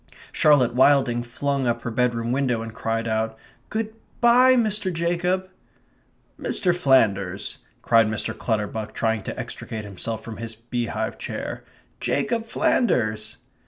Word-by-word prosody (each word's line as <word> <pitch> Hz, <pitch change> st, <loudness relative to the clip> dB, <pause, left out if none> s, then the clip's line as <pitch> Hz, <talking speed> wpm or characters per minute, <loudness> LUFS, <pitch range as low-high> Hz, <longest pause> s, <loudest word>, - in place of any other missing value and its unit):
Charlotte 135 Hz, -6 st, +4 dB
Wilding 130 Hz, -2 st, +4 dB
flung 135 Hz, +2 st, -2 dB
up 120 Hz, 0 st, -1 dB
her 120 Hz, -, -3 dB
bedroom 120 Hz, 0 st, 0 dB
window 125 Hz, -4 st, 0 dB
and 115 Hz, -1 st, -7 dB
cried 115 Hz, 0 st, -2 dB
out: 110 Hz, 0 st, -1 dB, 0.3 s
"Good 220 Hz, 0 st, -2 dB, 0.3 s
bye, 250 Hz, +2 st, +6 dB
Mr. 215 Hz, -5 st, +1 dB
Jacob!" 175 Hz, +2 st, 0 dB, 0.9 s
"Mr. 180 Hz, -2 st, 0 dB
Flanders!" 100 Hz, -, +2 dB, 0.2 s
cried 115 Hz, -2 st, +5 dB
Mr. 110 Hz, 0 st, -2 dB
Clutterbuck, 110 Hz, -1 st, -2 dB
trying 110 Hz, -1 st, 0 dB
to -, -, -6 dB
extricate 110 Hz, -3 st, -6 dB
himself 105 Hz, +3 st, -5 dB
from 115 Hz, -1 st, -7 dB
his 115 Hz, -1 st, -6 dB
beehive 115 Hz, -1 st, -3 dB
chair. -, -, -5 dB, 0.4 s
"Jacob 225 Hz, +11 st, 0 dB
Flanders!" 110 Hz, -, +1 dB
120 Hz, 125 wpm, -24 LUFS, 110-155 Hz, 0.9 s, bye